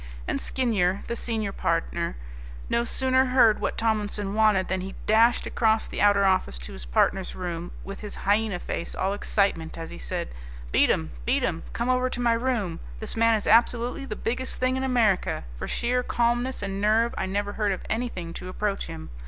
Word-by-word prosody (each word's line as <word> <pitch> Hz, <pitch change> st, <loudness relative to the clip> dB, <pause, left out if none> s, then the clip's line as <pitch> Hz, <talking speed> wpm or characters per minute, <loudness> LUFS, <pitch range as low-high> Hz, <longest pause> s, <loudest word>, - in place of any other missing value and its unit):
And -, -, -1 dB
Skinyer, 200 Hz, -, 0 dB
the 235 Hz, -, -3 dB
senior 220 Hz, -4 st, -2 dB
partner, -, -, -1 dB, 0.5 s
no 235 Hz, -, +2 dB
sooner 260 Hz, +2 st, +3 dB
heard 250 Hz, -4 st, +4 dB
what -, -, -1 dB
Tomlinson 210 Hz, -3 st, -1 dB
wanted 210 Hz, -3 st, +3 dB
than 190 Hz, 0 st, -1 dB
he 190 Hz, +1 st, -7 dB
dashed 225 Hz, +3 st, +4 dB
across 220 Hz, -1 st, +2 dB
the -, -, -4 dB
outer 205 Hz, -1 st, +5 dB
office 185 Hz, -, +2 dB
to -, -, -8 dB
his 60 Hz, -1 st, -8 dB
partner's 185 Hz, -, +1 dB
room 175 Hz, -1 st, -4 dB
with 195 Hz, -, -7 dB
his 210 Hz, -1 st, -7 dB
hyena 205 Hz, -1 st, +2 dB
face 170 Hz, -, -5 dB
all 190 Hz, +1 st, 0 dB
excitement 195 Hz, -5 st, 0 dB
as 165 Hz, 0 st, -6 dB
he -, -, -9 dB
said: -, -, -4 dB, 0.4 s
"Beatem, 80 Hz, +3 st, +2 dB, 0.2 s
Beatem, -, -, +1 dB
come -, -, -2 dB
over 255 Hz, 0 st, +2 dB
to 250 Hz, -, -5 dB
my 240 Hz, -1 st, +3 dB
room. 230 Hz, -7 st, -1 dB, 0.2 s
This -, -, -4 dB
man 230 Hz, 0 st, +4 dB
is 215 Hz, -, -2 dB
absolutely 240 Hz, +4 st, +3 dB
the 215 Hz, -, -5 dB
biggest 250 Hz, +5 st, -3 dB
thing 255 Hz, 0 st, +1 dB
in 260 Hz, -, -2 dB
America. 235 Hz, -, +2 dB
For -, -, -5 dB
sheer 250 Hz, +1 st, 0 dB
calmness 240 Hz, 0 st, 0 dB
and 195 Hz, 0 st, -3 dB
nerve 220 Hz, +3 st, +3 dB
I 190 Hz, -, -2 dB
never 205 Hz, +1 st, -2 dB
heard 210 Hz, -2 st, 0 dB
of 190 Hz, -, -4 dB
anything 215 Hz, -8 st, -3 dB
to 180 Hz, -, -7 dB
approach 200 Hz, +1 st, -2 dB
him. 80 Hz, -4 st, -8 dB
210 Hz, 185 wpm, -26 LUFS, 190-235 Hz, 0.5 s, outer